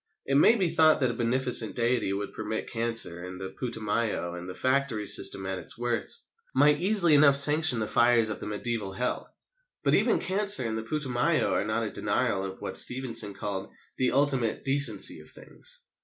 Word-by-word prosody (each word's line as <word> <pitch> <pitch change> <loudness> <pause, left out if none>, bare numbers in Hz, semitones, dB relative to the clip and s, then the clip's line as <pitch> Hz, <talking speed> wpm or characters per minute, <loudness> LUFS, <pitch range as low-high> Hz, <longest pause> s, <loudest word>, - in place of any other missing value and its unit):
It 135 - -3
may 150 +11 +4
be 190 -6 -1
thought 160 -1 +3
that 130 -2 +1
a - - -6
beneficent 120 0 +1
Deity 120 -2 -1
who 100 +1 -3
could 100 - -8
permit 110 0 -6
cancer 115 -7 -1
and 90 0 -9
the 95 0 -7
Putumayo 110 -6 -3
and 90 +1 -9
the 90 - -9
factory 130 -4 -2
system 95 -1 +2
at 95 -1 -5
its 90 - -7
worst, 120 -1 -3 0.3
might 145 +2 +3
easily 190 -4 +4
enough 145 -1 +5
sanction 150 -1 +6
the 110 - -2
fires 120 0 +2
of - - -6
the - - -8
mediæval 105 -2 -5
Hell. 125 - -4 0.5
But - - +1
even - - +2
cancer 195 -6 +4
and 110 -1 -3
the 110 - -4
Putumayo 125 0 -1
are - - -1
not - - -2
a - - -5
denial 95 -1 -2
of 95 0 -8
what - - 0
Stevenson 115 -5 +1
called 100 0 -6 0.3
"the 130 -1 +1
ultimate 135 -5 0
decency 140 +1 +3
of - - -14
things." - - -7
120 Hz, 190 wpm, -26 LUFS, 105-140 Hz, 0.5 s, sanction